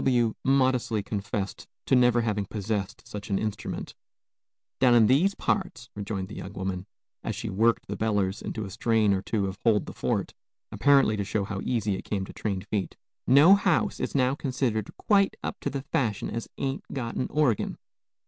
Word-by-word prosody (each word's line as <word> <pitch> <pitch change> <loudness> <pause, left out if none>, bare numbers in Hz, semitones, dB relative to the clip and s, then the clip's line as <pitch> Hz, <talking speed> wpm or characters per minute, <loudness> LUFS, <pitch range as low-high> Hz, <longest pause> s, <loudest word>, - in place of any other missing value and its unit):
W 120 -4 +3
modestly 130 -5 +2
confessed 100 0 -4 0.2
to - - +3
never 125 -1 +4
having 105 -3 -1
possessed 105 +1 -3
such 105 0 -7
an 100 - +1
instrument. 105 -1 -4 0.9
"Down 125 -2 +5
in 115 -2 +7
these 160 - +3
parts," 185 - -2
rejoined 100 -2 -4
the 105 - -9
young 95 - -7
woman, 95 -1 -4 0.4
as - - -3
she - - -4
"worked 115 +4 +2
the - - -4
bellers" 105 -3 0
into 110 -2 -4
a 95 - -8
strain 110 0 +2
or 95 - 0
two 100 0 -1
of 95 +1 -5
"Hold 110 -3 +3
the - - -8
Fort," - - -1 0.4
apparently 140 -6 +4
to 100 - -1
show 100 +1 -1
how 95 -1 -4
easy 110 -5 0
it 95 - -3
came 100 -2 -2
to - - -11
trained 95 -4 -3
feet, 100 -3 -3 0.3
"no 145 +8 +8
house 195 -4 +2
is - - -3
now 130 -1 +3
considered 130 -6 -1
quite 200 0 +3
up 200 - -4
to - - -2
the 140 -1 -4
fashi'n 110 -6 0
as 115 0 -4
ain't 135 0 -2
got 120 -4 -4
a - - -1
orgin." 145 -8 +1
110 Hz, 185 wpm, -27 LUFS, 100-130 Hz, 0.9 s, no